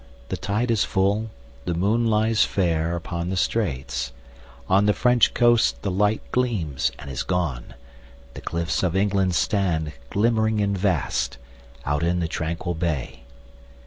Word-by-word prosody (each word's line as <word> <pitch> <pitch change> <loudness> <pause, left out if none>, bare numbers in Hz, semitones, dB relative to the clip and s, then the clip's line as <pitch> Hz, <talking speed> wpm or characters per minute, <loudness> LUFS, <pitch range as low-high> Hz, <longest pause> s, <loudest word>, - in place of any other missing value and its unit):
The - - -1
tide 115 +4 -1
is 110 -4 +3
full, 100 +3 +1 0.4
the 85 - -1
moon 110 +7 +2
lies 110 0 +2
fairUpon 85 -1 0
the 95 - -2
straits;—on 65 - -2
the 105 - +4
French 125 -2 +3
coast 120 -1 +4
the 100 - -1
lightGleams 105 - 0
and 70 - -8
is 65 - -3
gone; 85 -12 -2 0.6
the - - -8
cliffs 85 0 -1
of 90 -2 0
England 95 -2 +2
stand, 85 -8 0 0.2
Glimmering 110 0 +2
and 100 -1 +1
vast, 85 -10 0 0.5
out 75 +2 0
in 85 +1 +1
the 85 - 0
tranquil 85 +2 -3
bay. 80 -7 -3
90 Hz, 135 wpm, -24 LUFS, 80-105 Hz, 0.6 s, the